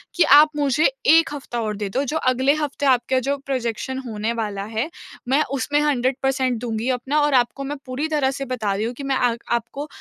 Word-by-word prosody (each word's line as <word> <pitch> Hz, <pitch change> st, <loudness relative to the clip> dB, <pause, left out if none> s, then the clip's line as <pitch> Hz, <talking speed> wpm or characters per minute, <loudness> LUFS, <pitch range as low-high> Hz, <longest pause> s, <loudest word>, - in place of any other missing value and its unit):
कि 355 Hz, -, +5 dB
आप 295 Hz, +2 st, +7 dB
मुझे 290 Hz, +1 st, +1 dB, 0.2 s
1 330 Hz, +1 st, +6 dB
हफ़्ता 250 Hz, -4 st, -5 dB
और 215 Hz, -1 st, -2 dB
दे 205 Hz, -1 st, -3 dB
दो, 260 Hz, +8 st, -1 dB
जो 300 Hz, +3 st, -2 dB
अगले 260 Hz, +3 st, +2 dB
हफ़्ते 295 Hz, -2 st, -3 dB
आपका 255 Hz, -1 st, +3 dB
जो 280 Hz, 0 st, +1 dB
प्रोज़ेक्शन 260 Hz, -1 st, -3 dB
होने 220 Hz, 0 st, -2 dB
वाला 210 Hz, -4 st, -3 dB
है, 225 Hz, +7 st, -3 dB, 0.4 s
मैं 270 Hz, +4 st, +3 dB
उसमें 280 Hz, +2 st, 0 dB
100 265 Hz, -3 st, +1 dB
पर्सेंट 260 Hz, -2 st, +1 dB
दूँगी 230 Hz, 0 st, -2 dB
अपना 260 Hz, +4 st, 0 dB
और 295 Hz, -1 st, +2 dB
आपको 255 Hz, +2 st, +1 dB
मैं 290 Hz, +2 st, -4 dB
पूरी 260 Hz, +4 st, -3 dB
तरह 295 Hz, -4 st, +1 dB
से 275 Hz, 0 st, -5 dB
बता 230 Hz, -6 st, -2 dB
रही 205 Hz, +3 st, -2 dB
हूँ 235 Hz, -, -3 dB
कि 280 Hz, -, -8 dB
मैं 275 Hz, -1 st, 0 dB
आ 245 Hz, -2 st, +2 dB, 0.2 s
आपको 235 Hz, +5 st, -5 dB
260 Hz, 215 wpm, -22 LUFS, 235-285 Hz, 0.4 s, आप